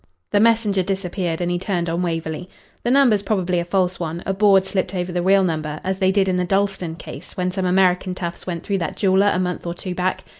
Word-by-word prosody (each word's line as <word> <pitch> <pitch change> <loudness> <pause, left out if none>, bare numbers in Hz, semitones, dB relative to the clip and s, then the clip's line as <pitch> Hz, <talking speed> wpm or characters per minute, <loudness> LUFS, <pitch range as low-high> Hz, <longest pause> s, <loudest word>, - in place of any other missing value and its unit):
The 205 - +3
messenger 220 -3 +3
disappeared, 180 -2 -2
and 175 0 0
he 175 - 0
turned 180 -2 -2
on 165 +2 -1
Waverley. 165 0 -3 0.3
"The - - 0
number's 250 -6 +4
probably 185 -4 0
a - - -1
false 180 0 0
one 170 0 -4
a 195 - 0
board 195 -1 +4
slipped 190 -1 -2
over 180 0 -2
the 175 0 -1
real 195 +2 +4
number, 155 -3 -2
as 190 0 -2
they 190 -1 +3
did 195 -1 +2
in 185 -1 +1
the 180 - +1
Dalston 195 -3 0
case - - -10
when 180 0 0
some 185 0 -1
American 180 0 +2
toughs 175 -1 -6
went 170 -2 -4
through 200 -1 -1
that 170 - -3
jeweller 195 0 +3
a - - 0
month 180 -1 -2
or 170 - -3
two 180 +1 -5
back. 185 +1 -1
185 Hz, 235 wpm, -21 LUFS, 175-195 Hz, 0.3 s, number's